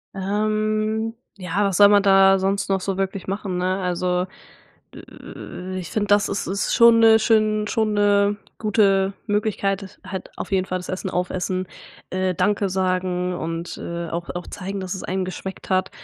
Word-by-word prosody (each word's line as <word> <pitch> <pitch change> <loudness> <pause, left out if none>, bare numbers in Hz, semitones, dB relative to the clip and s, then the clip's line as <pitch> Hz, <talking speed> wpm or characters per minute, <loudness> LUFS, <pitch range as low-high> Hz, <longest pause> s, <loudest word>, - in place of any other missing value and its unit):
Ähm, 215 +2 -1 0.2
ja 190 +2 -1
was 195 -3 0
soll 205 +1 +7
man 205 -1 +5
da 195 -1 +5
sonst 195 +1 -1
noch 195 -1 +2
so 195 0 -3
wirklich 195 -1 -3
machen, 195 -2 -3
ne, 185 +2 0
also, 180 0 0 0.7
äh, 185 +1 -8
ich 175 - -7
finde 205 -2 -1
das 205 0 +3
ist 200 - -3
ist 195 +1 -1
schon 235 -1 +7
'ne 225 0 +7
schön 215 -1 +2
schon 220 -2 0
'ne 205 0 +3 0.2
gute 195 -3 +2
Möglichkeit 205 -1 0
das 190 - -12
halt 185 -1 -6
auf - - -6
jeden 190 -1 +1
Fall 185 - -2
das 180 - -10
Essen 185 0 -3
aufessen, 185 +1 -2 0.4
äh, 185 0 0
„Danke“ 205 +2 +1
sagen 185 -1 -1
und, 165 0 -5
äh, 170 -1 -5
auch 170 +1 -4
auch 175 - -5
zeigen, 195 +1 -5
dass 185 0 -4
es 190 - -7
einen 185 0 -2
geschmeckt 190 +1 -7
hat 185 0 +1
195 Hz, 175 wpm, -22 LUFS, 185-205 Hz, 0.7 s, soll